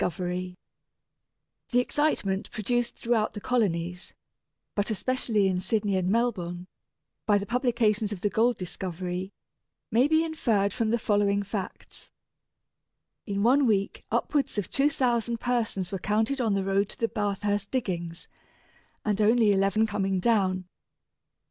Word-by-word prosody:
pp. -, -, +2 dB
28 180 Hz, -1 st, -2 dB
31 180 Hz, 0 st, -4 dB, 1.1 s
The 245 Hz, -, +3 dB
excitement 250 Hz, -8 st, 0 dB
produced 240 Hz, +3 st, -1 dB
throughout 230 Hz, -2 st, 0 dB
the -, -, -4 dB
colonies, 180 Hz, -7 st, -1 dB, 0.6 s
but 205 Hz, +1 st, -1 dB
especially 220 Hz, -2 st, +1 dB
in 185 Hz, -1 st, 0 dB
Sydney 200 Hz, +1 st, 0 dB
and 185 Hz, -1 st, 0 dB
Melbourne, 185 Hz, -6 st, -1 dB, 0.6 s
by 205 Hz, -1 st, +5 dB
the 200 Hz, -, -3 dB
publication 235 Hz, -3 st, +1 dB
of 195 Hz, -4 st, -5 dB
the 205 Hz, -, +1 dB
gold 235 Hz, +2 st, +2 dB
discovery, 180 Hz, +1 st, -4 dB, 0.6 s
may 245 Hz, +5 st, +4 dB
be 315 Hz, +1 st, +3 dB
inferred 225 Hz, -11 st, +1 dB
from 230 Hz, -3 st, 0 dB
the 235 Hz, -, +2 dB
following 205 Hz, -2 st, +1 dB
facts: 200 Hz, -1 st, -7 dB, 1.2 s
In 200 Hz, -1 st, -1 dB
one 265 Hz, +3 st, +4 dB
week 200 Hz, -3 st, 0 dB
upwards 280 Hz, -7 st, 0 dB
of 205 Hz, -, -2 dB
2,000 245 Hz, -5 st, +1 dB
persons 225 Hz, -7 st, -1 dB
were 195 Hz, -, -3 dB
counted 220 Hz, +7 st, 0 dB
on 220 Hz, -4 st, +1 dB
the 195 Hz, -, 0 dB
road 195 Hz, +1 st, +1 dB
to -, -, -9 dB
the 230 Hz, -, +2 dB
Bathurst 205 Hz, -1 st, -1 dB
diggings, 175 Hz, -9 st, -3 dB, 0.8 s
and 210 Hz, -1 st, +1 dB
only 220 Hz, 0 st, +4 dB
eleven 200 Hz, +2 st, +3 dB
coming 195 Hz, -3 st, -1 dB
down. 190 Hz, -3 st, +1 dB
205 Hz, 140 wpm, -27 LUFS, 190-235 Hz, 1.2 s, by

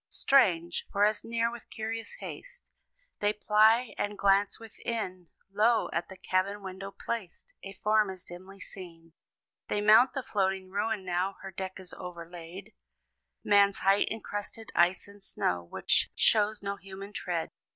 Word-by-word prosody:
Strange! 175 Hz, -11 st, +2 dB
for, 200 Hz, 0 st, +4 dB
as 210 Hz, 0 st, 0 dB
near 230 Hz, 0 st, 0 dB
with 235 Hz, -1 st, -11 dB
curious 225 Hz, -, -5 dB
haste -, -, -9 dB, 0.5 s
They 205 Hz, 0 st, +2 dB
ply, 215 Hz, +3 st, +4 dB
and 205 Hz, 0 st, -2 dB
glance 200 Hz, 0 st, +3 dB
within, 220 Hz, -5 st, -5 dB, 0.2 s
Lo! 220 Hz, +3 st, +3 dB
at 170 Hz, -, -2 dB
the 190 Hz, -, -10 dB
cabin 190 Hz, +2 st, -1 dB
window 190 Hz, +1 st, -6 dB
placed, 225 Hz, -, -6 dB
A 195 Hz, -, -8 dB
form 210 Hz, +1 st, +2 dB
is 185 Hz, -1 st, -8 dB
dimly 185 Hz, +3 st, -11 dB
seen. 165 Hz, -4 st, -10 dB, 0.5 s
They 210 Hz, -, 0 dB
mount 220 Hz, +5 st, +6 dB
the 270 Hz, -, -3 dB
floating 190 Hz, -3 st, -1 dB
ruin 205 Hz, 0 st, -1 dB
now 180 Hz, +2 st, 0 dB
Her 195 Hz, -, -6 dB
deck 190 Hz, 0 st, -6 dB
is 185 Hz, -2 st, -8 dB
overlaid 175 Hz, +1 st, -9 dB, 0.7 s
Man's 200 Hz, -1 st, +4 dB
height 195 Hz, +1 st, +4 dB
in 220 Hz, 0 st, -4 dB
crusted 205 Hz, +2 st, -6 dB
ice 175 Hz, +3 st, +3 dB
and 200 Hz, 0 st, -15 dB
snow, 90 Hz, -, -1 dB
Which -, -, +1 dB
shows 210 Hz, -1 st, +3 dB
no 200 Hz, 0 st, -3 dB
human 195 Hz, +1 st, -10 dB
tread. 170 Hz, -4 st, -2 dB
200 Hz, 150 wpm, -30 LUFS, 185-215 Hz, 0.7 s, mount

